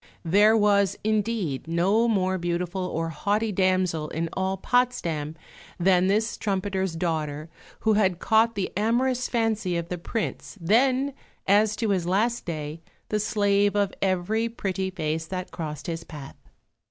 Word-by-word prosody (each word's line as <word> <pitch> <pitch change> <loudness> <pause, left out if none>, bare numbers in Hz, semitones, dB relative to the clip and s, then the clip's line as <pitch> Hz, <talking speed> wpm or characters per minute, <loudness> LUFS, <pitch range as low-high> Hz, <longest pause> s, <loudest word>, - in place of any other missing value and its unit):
There 205 +6 +5
was, 200 -3 +3
indeed, 210 - -1
no 190 +8 +2
more 190 -4 +1
beautiful 175 +2 -2
or 165 -1 -2
haughty 210 +6 0
damsel 185 -5 +1
in 165 +1 -2
all 190 0 -1
Potsdam 170 -11 0 0.4
than 180 0 +4
this 215 +4 +1
trumpeter's 190 -3 -1
daughter 155 -2 -2 0.3
who 220 - +3
had 190 -4 +2
caught 220 +4 +3
the 195 -2 -2
amorous 245 +5 +1
fancy 220 -6 0
of 170 0 -4
the 180 - -4
Prince, 215 +3 -4
then, 255 +9 +2 0.3
as 210 +2 +4
to 220 -2 -1
his 180 -3 0
last 225 +6 +1
day, 155 -1 -5 0.3
the 210 - 0
slave 205 -1 +2
of 200 -1 +1
every 195 +4 0
pretty 190 -4 -3
face 160 -3 -3
that 185 +1 -5
crossed 150 -4 -6
his 165 -2 -4
path. 145 -5 -10
190 Hz, 145 wpm, -25 LUFS, 170-215 Hz, 0.4 s, There